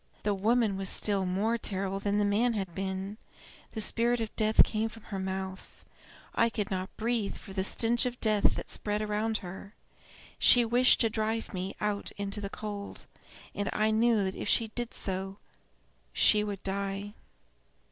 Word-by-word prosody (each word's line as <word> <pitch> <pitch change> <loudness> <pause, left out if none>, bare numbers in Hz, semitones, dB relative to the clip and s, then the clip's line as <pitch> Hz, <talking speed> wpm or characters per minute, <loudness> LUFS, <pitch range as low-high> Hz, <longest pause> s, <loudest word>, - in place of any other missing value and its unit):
The 205 - +1
woman 215 +1 +1
was 195 -1 0
still 195 -3 +1
more 215 +6 0
terrible 195 -2 -2
than 205 +1 0
the 210 - +2
man 220 +4 +2
had 195 -5 -3
been; 195 +2 -4 0.5
the 220 - -1
spirit 235 +3 +3
of 225 -1 -4
death 215 0 +5
came 220 +1 -1
from 225 -1 -13
her 195 -3 -5
mouth; 190 0 -6 0.5
I 230 - +3
could 210 -3 -3
not 185 0 -4
breathe 225 -2 -1
for 195 - -11
the 190 -1 -1
stench 235 +4 +2
of 245 0 -6
death 215 -2 +3
that - - -5
spread 210 0 -1
around 215 +1 0
her. 190 +4 -9 0.6
She 245 -1 +7
wished 245 +2 +4
to 225 - +3
drive 220 +1 -2
me 185 +1 -4
out 210 -1 -2
into 200 +1 -3
the 200 - -4
cold, 205 -1 -7 0.5
and 205 0 -2
I 215 +1 +2
knew 220 -1 +3
that 190 0 -2
if 205 - -4
she 225 -2 +2
did 240 +1 -5
so 190 0 -1 0.8
she 210 -1 +5
would 205 -2 -5
die. 200 +1 -3
210 Hz, 175 wpm, -29 LUFS, 195-225 Hz, 0.8 s, She